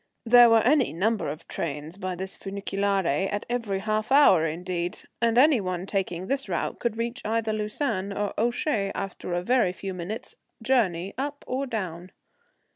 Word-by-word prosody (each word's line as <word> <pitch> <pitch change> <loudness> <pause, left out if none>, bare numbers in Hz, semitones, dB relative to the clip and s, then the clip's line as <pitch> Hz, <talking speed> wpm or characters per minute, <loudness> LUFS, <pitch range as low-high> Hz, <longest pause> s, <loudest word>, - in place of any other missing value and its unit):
There 240 0 +8
were 225 -1 +6
any 270 +1 +3
number 210 +6 0
of 150 +2 -7
trains 155 +3 -5
by 185 -1 -3
this 190 +2 -5
funiculaire 195 -1 -1
at 205 - -3
every 230 -5 -1
half 215 +2 -1
hour 195 - +6
indeed 175 +3 -3 0.2
and 230 0 +2
any 270 -2 +6
one 185 -1 -3
taking 185 -3 -2
this 275 +4 -2
route - - -2
could 235 -2 -1
reach 235 +3 -3
either 220 0 0
Lausanne 210 -2 -2
or 205 0 -2
Ouchy 235 -2 0
after 190 -2 -4
a 175 - -1
very 240 -4 +2
few 190 +1 -6
minutes' 185 +5 -6 0.3
journey 195 -8 +1
up 285 +1 -4
or 265 +2 -2
down. 185 -6 -4
205 Hz, 165 wpm, -26 LUFS, 185-235 Hz, 0.3 s, There